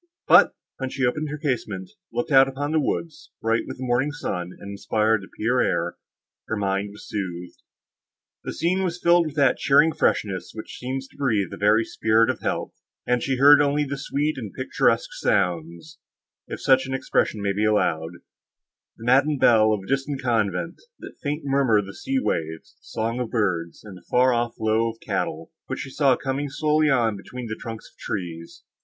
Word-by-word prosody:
But, - - +6 0.2
when 130 -1 -3
she 135 0 -1
opened 150 +5 -1
her 150 - -4
casement, 110 - -3 0.2
looked 120 +5 -3
out 135 -1 +7
upon 145 +2 -3
the 160 - +2
woods, 155 +3 -3
bright 115 +1 0
with - - -7
the 130 - -6
morning 130 +3 +1
sun, 90 -11 -4
and 100 - -8
inspired 110 +1 +1
the 95 - -11
pure 125 +3 +1
air, 85 +1 -1 0.5
her - - -2
mind 100 0 -1
was 105 - -13
soothed. 90 -4 -5 0.8
The - - -4
scene 180 +4 0
was 180 -2 -2
filled 170 -1 +4
with 150 - -8
that 140 -4 +3
cheering 145 +3 +4
freshness, 95 -4 -1
which 110 - -8
seems 130 +1 -4
to - - -23
breathe 110 -10 0
the - - -5
very 105 +2 +3
spirit 110 +1 +2
of - - -8
health, - - -3 0.3
and 125 -1 +1
she 135 0 -1
heard 145 +3 +8
only 145 +1 +1
sweet 140 +1 -2
and 110 -5 -6
picturesque - - 0
sounds, 85 - -1 0.5
if - - -6
such 130 0 +4
an 135 - -2
expression 110 -4 0
may 100 -1 0
be 105 +2 0
allowed—the 85 +2 -4
matin 135 +4 +3
bell 110 -4 +5
of 105 -3 -1
a - - -13
distant 135 +1 -1
convent, 115 - -1 0.2
the - - -10
faint 150 +1 -3
murmur 135 -5 +3
of 105 - 0
the 100 - -9
sea 270 - -3
waves, 80 - -3
the - - -25
song 115 +2 -3
of 125 -3 -2
birds, 90 -8 -1
and 105 -3 -10
the - - -18
far 125 +1 +4
off 120 0 -1
low 110 +1 +1
of 115 0 -9
cattle, 80 +1 -3 0.2
which - - -4
she 135 - -7
saw 135 -2 +3
coming 135 +3 -3
slowly 150 +1 +2
on 115 -6 +2
between 125 +5 -8
the 110 -1 -4
trunks 115 -1 -8
of - - -36
trees. 85 -4 -6
120 Hz, 190 wpm, -24 LUFS, 105-140 Hz, 0.8 s, heard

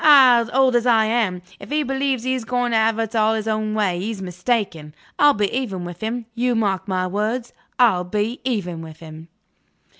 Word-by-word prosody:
Aha! 255 -6 +7
old 260 -1 +3
as 240 +1 +2
I 225 -2 +4
am, 215 -6 0 0.2
if - - -11
he 300 +1 0
believes 270 -2 -1
he's 255 -1 -1
going 245 +1 -1
to - - +1
have 220 0 +2
it 225 0 -3
all 220 0 +3
his 220 0 -4
own 215 0 -1
way, 195 -5 0
he's 210 +2 -4
mistaken. 180 -4 -3 0.2
I'll 290 0 +6
be 205 -1 -1
even 200 -9 -3
with 175 0 -9
him. 230 +2 -3
You 245 +1 0
mark 200 -4 -1
my 185 -1 -1
words: 215 +6 -2 0.2
I'll 220 -8 +4
be 210 +6 -3
even 195 -10 -2
with 160 -1 -10
him." 160 0 -11
220 Hz, 200 wpm, -21 LUFS, 190-245 Hz, 0.2 s, Aha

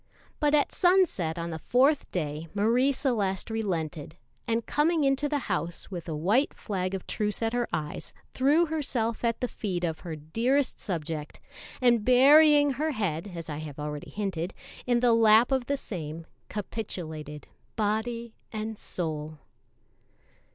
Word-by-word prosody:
But 295 -1 +3
at 290 - +2
sunset 355 - +2
on 170 0 -3
the 160 - -5
fourth 270 - +2
day 155 -2 -3
Marie 235 +7 +3
Celeste 225 -8 -1
relented, 165 -8 -3 0.3
and 230 0 0
coming 315 +1 +2
into 275 +1 +2
the 295 - +1
house 170 +5 -3
with 175 -2 -6
a 155 - -2
white 205 - +2
flag 190 -2 -3
of 190 - -6
truce 210 +1 -2
at 225 +1 0
her 240 -1 0
eyes, 150 -1 -4 0.2
threw 290 +6 +4
herself 255 -8 -2
at 230 -1 0
the 250 - +1
feet 185 -7 -4
of 160 -2 -1
her 165 -3 -6
dearest 235 - 0
subject, 160 -5 -4 0.4
and 240 -3 +4
burying 290 +4 +7
her 300 +4 -1
head, 200 - -2
as 165 -1 -6
I 150 -2 -4
have 150 -2 -7
already 150 0 -5
hinted, 190 -4 -3 0.3
in 240 -1 +3
the 245 -2 +5
lap 225 +2 +6
of 260 -2 +1
the 280 - 0
same, 165 - -6 0.2
capitulated 160 -8 -5 0.3
body 225 +2 -1 0.2
and 220 0 -4
soul. 155 -3 -4
215 Hz, 150 wpm, -28 LUFS, 165-255 Hz, 0.4 s, burying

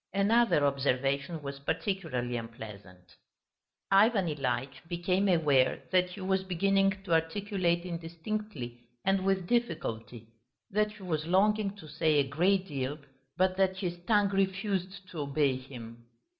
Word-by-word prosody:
Another 200 -6 +4
observation 140 +3 0
was 140 0 -6
particularly 140 - -2
unpleasant. 100 -6 -9 0.7
Ivan 200 0 +5
Ilyitch 130 -3 -2
became 180 +3 0
aware 150 -7 +3
that 180 -1 +3
he 185 +2 -9
was 190 0 +1
beginning 195 +1 +1
to 175 -4 -1
articulate 175 +1 +1
indistinctly 170 - -5 0.3
and 195 0 +2
with 190 -1 +1
difficulty, 125 - -2 0.5
that 210 +1 +1
he 210 -2 -13
was 160 -3 -2
longing 200 +2 +2
to 180 -6 -12
say 155 +1 +1
a 140 -2 +3
great 185 +7 +2
deal, 140 -3 -3 0.4
but 185 0 +2
that 190 -1 +2
his 180 -2 -2
tongue 205 -3 +4
refused 195 -1 -1
to 170 - -7
obey 140 -1 +1
him. 120 -3 -10
175 Hz, 130 wpm, -30 LUFS, 140-195 Hz, 0.7 s, Ivan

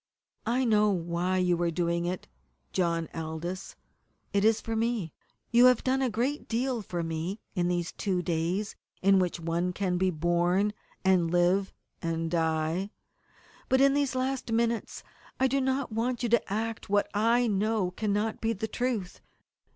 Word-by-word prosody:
"I 250 +3 +2
know 210 -2 +4
why 175 0 0
you 180 -2 +2
are 170 - +2
doing 170 0 0
it, 180 +1 -4 0.5
John 170 -3 0
Aldous. 165 +4 -5 0.6
It 200 0 +2
is 220 0 +4
for 225 - -4
me. 225 -7 -1 0.4
You 240 +1 +7
have 250 -2 +5
done 265 +1 +1
a 260 - +2
great 245 +7 -1
deal 240 +1 -1
for 175 -4 -4
me 165 +5 -3
in 175 -3 0
these 175 -1 -1
two 185 -3 -1
days 175 +5 -1 0.3
in 195 0 +6
which 180 -2 0
one 170 +2 -1
'can 180 -2 -1
be 190 0 +3
born, 175 +4 +1 0.3
and 185 -3 +4
live, 180 +3 +2 0.3
and 165 -1 -2
die.' 160 +3 0 0.8
But 260 - +4
in 275 0 +5
these 280 -3 +1
last 255 -2 -1
minutes 230 0 0 0.4
I 265 - +4
do 275 +1 +1
not 265 -1 0
want 240 +2 -1
you 240 - +1
to 235 -3 +2
act 225 +1 -3
what 205 0 +2
I 230 +4 +3
know 210 -2 +1
cannot 210 +2 -1
be 225 0 +1
the 220 +1 -3
truth. 225 -5 -2
195 Hz, 165 wpm, -29 LUFS, 175-230 Hz, 0.8 s, You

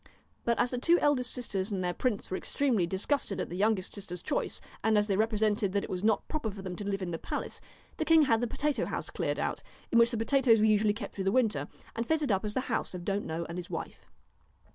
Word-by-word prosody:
But 235 -1 +2
as 240 0 +2
the 250 - -2
two 335 +7 +4
eldest 270 -6 +2
sisters 200 -5 -1
and 195 -3 -2
their 180 0 0
princes 215 -1 -2
were - - 0
extremely 240 -11 +1
disgusted 195 - -1
at - - -3
the 175 - -5
youngest 205 0 +1
sister's 180 -4 -5
choice, - - -1 0.2
and 220 -1 +3
as 210 - +3
they 200 -2 0
represented 215 -2 +1
that 200 - +1
it - - -6
was 185 +1 -3
not 215 -1 +2
proper 300 -8 -2
for 195 -1 -8
them 185 -2 -5
to 205 -1 -3
live 195 -1 -2
in 175 - -3
the 165 - -3
palace, - - -5 0.4
the - - 0
king 325 -1 +6
had 230 -5 +3
the 245 - +1
potato 295 +5 -1
house - - -3
cleared - - -1
out, - - -2 0.3
in 235 - +5
which 235 0 +6
the 235 - -3
pota 265 +5 +2
toes 230 -4 +6
were 215 - +4
usually 215 -1 +4
kept 210 -1 -6
through 195 - -4
the 195 - +3
winter, 230 -3 +1 0.3
and 230 +1 -2
fitted 310 -6 +1
up 195 0 +1
as 210 -1 -3
the 260 - +2
house 250 - -2
of 175 -1 -7
Don't 200 0 -1
know 165 +1 -3
and 170 +2 -5
his 175 - -7
wife. - - -6
215 Hz, 260 wpm, -30 LUFS, 195-245 Hz, 0.4 s, king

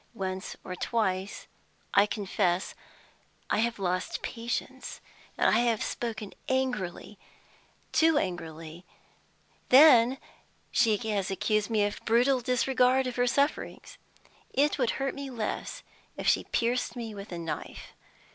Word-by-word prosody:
Once 190 -2 -4
or 185 - -6
twice, 190 -2 -2 0.5
I 200 +1 +5
confess, 195 -3 -1 0.8
I - - +2
have 235 +1 0
lost 185 -2 -2
patience, 240 +2 -4 0.4
and - - +3
have 235 -1 +2
spoken 220 -4 -4 0.2
angrily, 245 -7 -2 0.7
too 320 -1 +4
angrily; 165 - -4 0.9
then 260 -2 +7 0.5
she 220 -2 +3
has 200 -3 0
accused 210 +2 0
me 215 -2 +2
of 205 - -4
brutal 250 +3 +3
disregard 255 +1 +2
of 250 -1 -3
her 245 0 +2
sufferings. 280 +4 -1 0.5
It 290 +1 +2
would 245 -3 +2
hurt 270 0 -1
me 280 -1 -6
less 230 -4 -4 0.3
if - - -4
she - - +3
pierced 245 +3 0
me 230 -3 -5
with 200 0 -9
a 175 - -4
knife. 165 -2 -6
230 Hz, 125 wpm, -29 LUFS, 195-250 Hz, 0.9 s, then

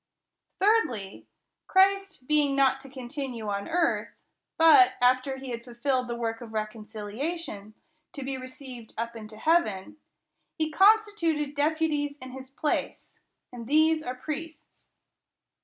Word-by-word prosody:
Thirdly, 315 - +1 0.4
Christ 390 -5 +2
being 295 -2 +2
not 270 -1 +3
to 270 - -11
continue 255 -3 -5
on 200 0 -3
earth, 340 0 +1 0.5
but, 330 +4 +7
after 255 +2 +2
he 265 -1 -7
had 235 0 -5
fulfilled 250 +1 -1
the 235 - -3
work 230 -1 -3
of 225 -2 -9
reconciliation, 215 +3 -5 0.4
to 280 - -6
be 270 0 -3
received 255 -2 -9
up 235 +1 -3
into 215 -1 -9
heaven, 305 - +1 0.6
he 315 -1 -1
constituted 385 -6 +3
deputies 295 -1 0
in 255 -2 -10
his 260 0 -9
place; 295 +2 -3 0.3
and 235 -2 -8
these 315 +2 +4
are 250 -4 -5
priests. 315 +4 -8
270 Hz, 125 wpm, -27 LUFS, 235-315 Hz, 0.6 s, but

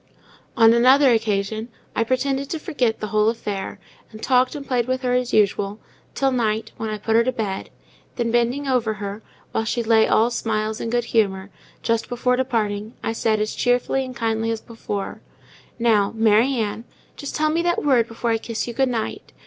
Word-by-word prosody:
On 225 -1 +7
another 260 +3 +6
occasion, 220 0 0 0.3
I 230 - +2
pretended 270 +3 -1
to 325 - -2
forget 250 -7 -1
the 215 - -3
whole 215 0 +3
affair; 205 -4 -4 0.3
and 215 - -10
talked 255 +2 +2
and 285 -1 -6
played 245 -2 0
with 255 0 -1
her 250 -1 +1
as 250 -1 0
usual, 205 0 +1 0.4
till 270 -1 +2
night, 220 -3 -1
when 220 - -3
I 215 - -3
put 220 +2 -1
her 230 - +5
to 255 - 0
bed; 210 -6 -4 0.5
then 235 -2 -1
bending 240 +4 +1
over 235 -5 +1
her, 205 +1 -6 0.3
while 225 - 0
she 235 +1 -1
lay 225 -1 +4
all 230 +2 +3
smiles 220 -2 -2
and 230 - -3
good 240 -1 +1
humour, 195 -3 +1 0.3
just 230 -1 0
before 250 +1 +1
departing, 220 -4 -1
I 225 - -1
said, 220 -1 +1
as 215 +1 -1
cheerfully 245 +2 +1
and 255 -1 -8
kindly 225 -1 -1
as 225 -1 -1
before—"Now, 215 0 -3
Mary 225 +4 +3
Ann, 220 -1 -2 0.3
just 285 - -6
tell 310 0 +2
me 330 +2 +1
that 345 -2 0
word 250 -5 +4
before 230 +1 -2
I 225 - +1
kiss 230 0 -4
you 235 - -4
good 265 +2 +1
night. 230 -3 -4
230 Hz, 190 wpm, -22 LUFS, 215-250 Hz, 0.5 s, On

